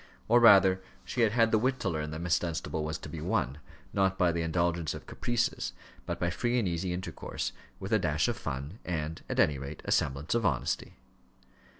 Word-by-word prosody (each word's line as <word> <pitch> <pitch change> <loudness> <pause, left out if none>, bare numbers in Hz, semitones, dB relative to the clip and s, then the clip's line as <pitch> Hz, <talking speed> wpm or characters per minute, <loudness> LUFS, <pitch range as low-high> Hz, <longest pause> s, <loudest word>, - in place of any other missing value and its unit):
Or 120 +2 +6
rather, 95 -5 +7 0.2
she 125 - -2
had 110 -2 +4
had 115 -1 +4
the 110 - +4
wit 130 +3 +1
to 100 - 0
learn 75 -2 -2
that 80 - -5
Miss 85 0 +2
Dunstable 80 -2 -3
was 75 0 -2
to - - -9
be - - -6
won, 70 +4 -1 0.3
not 95 -1 +2
by 90 -1 +3
the 85 0 -1
indulgence 85 -1 0
of - - -9
caprices, 120 0 -1 0.3
but 85 0 -3
by 85 -1 0
free 120 +7 0
and 115 -5 +1
easy 85 +1 -1
intercourse, 90 +1 -4 0.3
with 95 +3 -4
a 110 - +5
dash 75 -1 +1
of 120 - 0
fun, 75 - -5
and, 80 -2 -3
at - - -1
any 75 -3 +4
rate, 70 +2 -7
a - - -2
semblance 70 +4 +1
of 120 -1 +1
honesty. 75 - -1
85 Hz, 210 wpm, -30 LUFS, 80-110 Hz, 0.3 s, rather